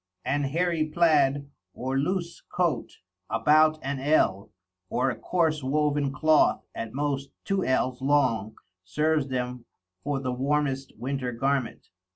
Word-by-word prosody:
An 145 +2 0
hairy 165 +2 0
Plad, 145 -4 +3 0.3
or 130 +2 -3
loose 170 +4 -1
Coat, 175 -4 0 0.4
about 155 +1 +4
an 135 0 -2
Ell, 130 -9 +2 0.4
or 130 +1 +1
a - - -5
coarse 160 -4 0
woven 145 +1 +1
Cloth 155 +2 +3
at 115 -1 -5
most 140 0 -2 0.2
Two 195 -1 0
Ells 130 0 0
long 115 -7 +1 0.3
serves 150 +8 0
them 125 -2 -3 0.4
for 145 -1 -1
the 130 -2 -2
warmest 135 0 -1
Winter 130 -1 -3
Garment. 135 +1 -2
140 Hz, 130 wpm, -27 LUFS, 130-155 Hz, 0.4 s, about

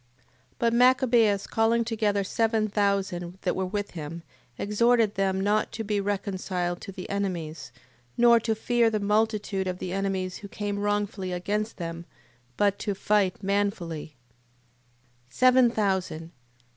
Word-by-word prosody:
8:16. - - -38
But 230 -1 +1
Machabeus 240 -5 +4
calling 230 +1 +2
together 210 -3 0
seven 220 +2 +1
thousand 195 -4 -1
that - - 0
were 190 0 -1
with 205 +1 -3
him, 165 0 -7 0.3
exhorted 225 +1 +2
them 190 -1 0
not 205 +2 +1
to 225 - -4
be 205 -1 -1
reconciled 190 -3 -2
to - - -7
the 185 -1 -8
enemies, 170 -9 -4 0.5
nor 235 -1 +6
to 225 0 -1
fear 235 +1 +2
the 215 -1 -1
multitude 210 -2 0
of 180 -1 -2
the 180 0 -5
enemies 190 -1 -2
who 200 - -9
came 205 -1 -4
wrongfully 205 -2 -1
against 205 +5 -2
them, 170 -1 -5 0.5
but 200 -1 +2
to 205 - -2
fight 200 -1 +1
manfully: 190 -7 -2 1.1
Seven 255 - +5
thousand... 190 -7 -1
200 Hz, 140 wpm, -26 LUFS, 185-220 Hz, 1.1 s, nor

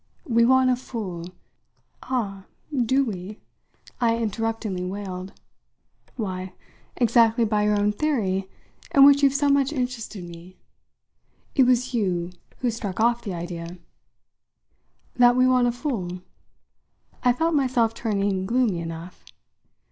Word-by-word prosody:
We 235 -2 +3
want 260 +1 +4
a - - +3
fool 200 -9 -6 0.4
" - - -43
"Ah, 200 -7 -3 0.3
do 260 +2 +2
we?" 200 -1 -6 0.6
I 230 -1 +2
interruptingly 225 -3 -2
wailed. 190 -1 -6 0.8
"Why, 185 -5 -4 0.4
exactly 235 -1 +4
by 210 -1 +1
your 210 0 +2
own 205 +1 +2
theory, 205 -7 -1 0.5
in 275 -1 +9
which 280 0 +6
you've 280 -1 +4
so 285 +1 +2
much 280 0 +3
interested 245 - -4
me! 175 +2 -12 1.0
It 265 - +4
was 250 0 +2
you 180 -6 -1 0.3
who 245 -2 +1
struck 205 -4 -5
off 235 +1 +2
the 195 -6 -5
idea." 170 0 -6 1.4
"That 245 0 +6
we 255 0 +4
want 250 -1 +4
a - - +2
fool?" 220 - -4 1.0
I 250 - +5
felt 325 +7 0
myself 250 -6 +2
turning 200 -4 -1
gloomy 235 -6 +1
enough. 165 +1 -8
225 Hz, 130 wpm, -24 LUFS, 190-250 Hz, 1.4 s, in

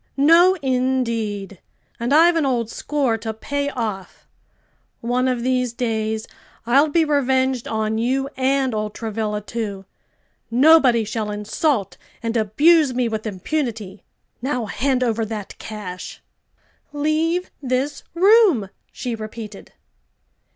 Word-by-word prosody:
No, 335 +6 +6
indeed! 230 -7 -1 0.4
And 235 +3 -2
I've 335 +4 +6
an 325 - +2
old 240 -4 -1
score 265 -6 -1
to 220 0 -5
pay 285 +5 -2
off. 215 -8 -5 0.7
One 245 +2 0
of 250 -2 -1
these 250 -1 0
days 220 -2 -2 0.4
I'll 275 +6 +4
be 325 +2 +2
revenged 265 -3 +1
on 220 0 -1
you 265 +4 0
and 265 -1 +1
old 215 -1 -3
Travilla, 215 -2 -3
too; 205 -3 -5 0.6
nobody 255 -2 +5
shall 215 0 -3
insult 210 - -1 0.3
and 230 0 -2
abuse 275 - +4
me 250 -1 +1
with 220 0 -4
impunity. 215 - -4 0.4
Now 250 -3 -1
hand 255 +5 0
over 230 -2 0
that 215 -2 -6
cash!" 195 -4 -7 0.7
"Leave 310 +4 0
this 265 +2 -1
room!" 375 - +5 0.2
she 245 - -4
repeated. 215 -1 -8
240 Hz, 120 wpm, -21 LUFS, 220-280 Hz, 0.7 s, No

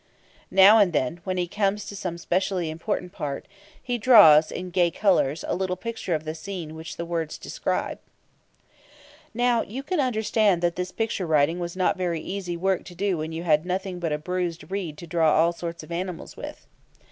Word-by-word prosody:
Now 195 +4 +7
and 190 -5 +4
then, 145 +3 0
when 185 -1 -2
he 175 -1 0
comes 205 +2 -1
to 200 - -7
some 180 -3 -4
specially 180 -1 -1
important 180 +2 -3
part, 140 -4 -5 0.4
he 245 -1 -2
draws, 185 -11 +7
in 180 0 -6
gay 175 -1 +3
colours, 165 -6 +1
a - - 0
little 185 0 -1
picture 225 -3 -3
of 155 - -3
the 155 0 -4
scene 165 -1 -6
which 160 0 -8
the 170 - -4
words 165 -2 -3
describe. - - -3 1.4
Now, 240 -1 +2
you 255 +7 -6
can 355 +3 -2
understand 220 -7 +2
that 170 -1 +1
this 180 0 -3
picture 215 -5 -2
writing 155 +2 +2
was 175 +1 -5
not 185 - +1
very 175 -3 -1
easy 180 -1 -4
work 190 +1 0
to 175 - -11
do 190 -2 0
when 155 +1 -4
you 165 +1 -5
had 155 -3 +3
nothing 185 0 -3
but 165 -2 -2
a 150 - 0
bruised 180 +2 -4
reed 180 -6 -3
to 170 - -9
draw 160 -1 +2
all 165 +2 +3
sorts 170 0 -6
of - - -13
animals 180 0 -5
with. - - -9
180 Hz, 195 wpm, -25 LUFS, 165-195 Hz, 1.4 s, Now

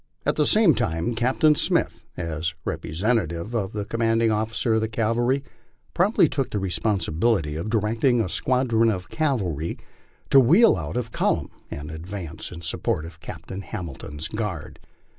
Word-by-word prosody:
At - - +2
the 150 - +2
same 210 -7 +5
time 105 -4 -1
Captain 130 +6 +3
Smith, - - 0
as 80 -1 -3
representative 90 +1 -1
of 100 -5 -1
the 105 -1 -3
commanding 115 0 +1
officer 110 +2 0
of 110 - +2
the 110 - 0
cavalry, 120 +5 +1 0.5
promptly 185 -1 +4
took 135 -1 -2
the - - -3
responsibility 95 -3 0
of 85 +7 -4
directing 115 +3 +2
a 110 - +1
squadron 115 +2 +2
of 90 -4 -3
cavalry 95 - -1 0.5
to 135 - +8
wheel 170 - +6
out 85 +2 -4
of 120 -2 -3
column - - 0 0.2
and 75 +2 -6
advance 85 0 -6
in 85 -1 -8
support 80 -1 -1
of 85 0 -11
Captain 95 +4 -7
Hamilton's 80 -5 -6
guard. 105 -8 -5
110 Hz, 150 wpm, -24 LUFS, 85-120 Hz, 0.5 s, to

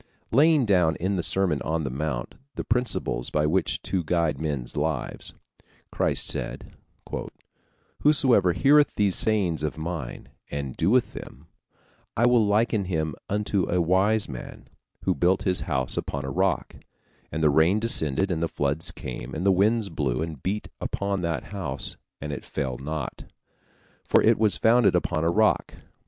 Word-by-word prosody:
Laying 150 +2 +5
down 90 -6 +3
in 95 +3 -1
the 90 - 0
Sermon 85 -5 0
on 80 0 -1
the 65 - -3
Mount 70 -2 -3 0.2
the - - -3
principles 120 - -1
by 75 0 +1
which 85 +4 0
to 95 -3 -1
guide 85 -1 0
men's 70 -6 -3
lives, 75 -2 -3 0.6
Christ - - 0
said: - - -5 1.3
"Whosoever 130 - +4
heareth 145 - +4
these 100 -3 +2
sayings 95 -8 +2
of 75 0 -2
mine, 80 -5 -5 0.2
and 70 -3 -4
doeth 115 +9 +2
them, - - -10 0.7
I 120 - +4
will 120 -2 +5
liken 105 0 +1
him 80 -4 -1 0.2
unto 105 -2 0
a 90 - +1
wise 95 +5 +2
man, 65 -4 -9 0.4
who - - +2
built 90 +6 +1
his 90 -1 +1
house 65 -4 0
upon 70 -1 -3
a 70 - -4
rock; 95 0 0 0.5
and 80 +1 -2
the 75 - +5
rain 80 +8 +4
descended, 95 - +1
and 80 -2 -1
the 85 - +1
floods 75 +1 -1
came, 65 0 -7
and 85 +4 -3
the 100 - +5
winds 105 +3 +2
blew, 70 -4 -1
and 80 -5 -7
beat 105 +3 -2
upon 100 -1 -2
that 85 -3 -2
house; 95 -2 -2 0.2
and 75 0 -5
it - - -6
fell 65 -3 -4
not, 75 +3 -5 0.8
for - - +3
it - - +4
was 110 -2 +3
founded 115 -3 +4
upon 85 -2 0
a 85 - +2
rock. 105 +5 +2
90 Hz, 160 wpm, -25 LUFS, 75-105 Hz, 1.3 s, Laying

